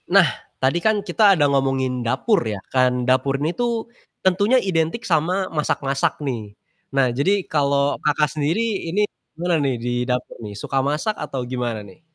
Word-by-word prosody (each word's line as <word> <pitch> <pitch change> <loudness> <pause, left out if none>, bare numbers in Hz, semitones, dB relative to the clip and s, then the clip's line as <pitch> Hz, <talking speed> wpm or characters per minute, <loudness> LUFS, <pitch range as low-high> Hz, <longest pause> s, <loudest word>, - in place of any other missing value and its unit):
Nah, - - +6 0.3
tadi 135 +6 +1
kan 215 -1 +1
kita 205 -3 +4
ada 145 - +4
ngomongin 135 -2 0
dapur 130 - +1
ya 105 - -3 0.2
kan? 125 -1 +2
Dapur 130 +2 +2
ini 150 +5 -1
tuh, 235 -1 -1 0.4
tentunya 200 +7 +4
identik 190 0 0
sama 180 +2 +1
masak-masak 140 -2 0
nih, 115 -8 -4 0.4
nah, 135 -2 +3
jadi 190 +11 +2
kalau 140 -1 +1
Kakak 150 0 +2
sendiri 155 +8 +1 0.3
ini 205 +5 +2 0.3
gimana 175 0 +1
nih 135 -3 +1
di 120 +1 -2 0.2
dapur 125 0 -2
nih? 105 - -7
Suka 135 +5 -1
masak 150 +9 0
atau 135 - -4
gimana 120 -3 -3
nih? 95 +8 -16
145 Hz, 165 wpm, -22 LUFS, 130-185 Hz, 0.4 s, Nah